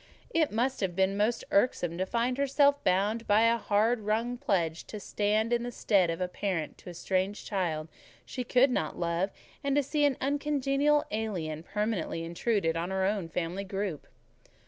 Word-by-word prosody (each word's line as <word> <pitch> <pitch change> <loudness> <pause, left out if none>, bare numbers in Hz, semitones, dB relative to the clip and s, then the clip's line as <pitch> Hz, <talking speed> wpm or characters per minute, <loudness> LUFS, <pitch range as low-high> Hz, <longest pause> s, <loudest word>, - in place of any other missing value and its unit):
It 320 -2 +2
must 250 +5 0
have 185 -4 -1
been 190 +1 +2
most 215 +4 +1
irksome 175 -6 +1
to 185 - 0
find 245 +4 0
herself 280 +1 +3
bound 205 +5 +1
by 210 +1 +5
a 230 0 +4
hard 220 +3 +2
wrung 220 +3 -1
pledge 175 - -1
to 215 - -7
stand 215 +3 0
in 240 - +2
the 245 +1 -4
stead 195 -6 +2
of 165 - -2
a 180 - 0
parent 180 -3 -3
to - - -10
a 175 - -9
strange 190 +3 -1
child 165 -6 -2 0.4
she 255 - -4
could 255 +2 +4
not 155 -10 -1
love, 170 +3 0 0.3
and 280 -1 +1
to 290 - +3
see 295 +2 0
an 285 -3 +3
uncongenial 285 +1 +1
alien 180 -8 -3
permanently 200 -3 -2
intruded 170 0 0
on 170 +2 -2
her 190 0 0
own 195 -4 -1
family 175 +4 -3
group. 195 -5 -4
205 Hz, 180 wpm, -29 LUFS, 180-245 Hz, 0.4 s, by